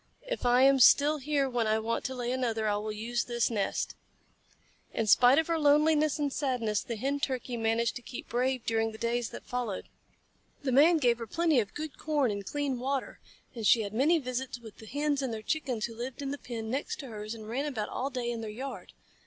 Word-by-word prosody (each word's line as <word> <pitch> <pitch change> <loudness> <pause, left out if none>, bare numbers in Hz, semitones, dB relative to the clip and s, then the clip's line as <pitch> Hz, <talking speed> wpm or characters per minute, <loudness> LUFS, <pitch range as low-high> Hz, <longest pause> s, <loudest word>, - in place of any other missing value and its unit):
"If - - -2
I 245 +1 +5
am 270 0 +6
still 290 +4 +6
here 285 0 +1
when 240 -3 0
I 215 0 +3
want 225 +1 -2
to 260 - -3
lay 245 -1 -2
another, 230 -4 -1
I 205 - +2
will 215 +1 -3
use 230 +3 -2
this 235 -1 0
nest." 205 -3 -1 1.0
In 225 - +1
spite 245 +5 +6
of 320 - +3
her 330 0 0
loneliness 300 +1 +4
and 290 -2 -1
sadness, 235 -7 0
the 235 - -5
Hen 275 +6 -1
Turkey 255 -3 -2
managed 230 0 0
to - - -10
keep 245 - -8
brave 255 +1 0
during 225 0 0
the - - -9
days 235 +1 -1
that - - -9
followed. 245 -6 -4 0.7
The 265 - 0
Man 310 +6 +6
gave 240 -5 +2
her 230 - -5
plenty 325 +2 +2
of 205 -3 -3
good 310 -1 -6
corn 295 -6 +1
and 200 -1 -4
clean 280 +3 -2
water, 270 +1 -3 0.3
and 225 -4 -2
she 225 - +5
had 200 0 -6
many 290 +9 +4
visits 255 -3 -3
with 225 -3 -12
the 220 - -11
Hens 290 +3 0
and 265 -3 -2
their 220 -1 -5
Chickens 255 -6 -1
who 230 - -7
lived 250 +4 -5
in 275 - -3
the 285 - -5
pen 225 -2 -5
next 270 +3 -2
to 275 - -8
hers 215 0 -6
and 215 -1 -10
ran 255 +6 -2
about 245 -8 -3
all 265 +2 -2
day 250 -3 -3
in 230 -1 -4
their 220 - -5
yard. 260 +6 -7
245 Hz, 225 wpm, -30 LUFS, 225-280 Hz, 1.0 s, am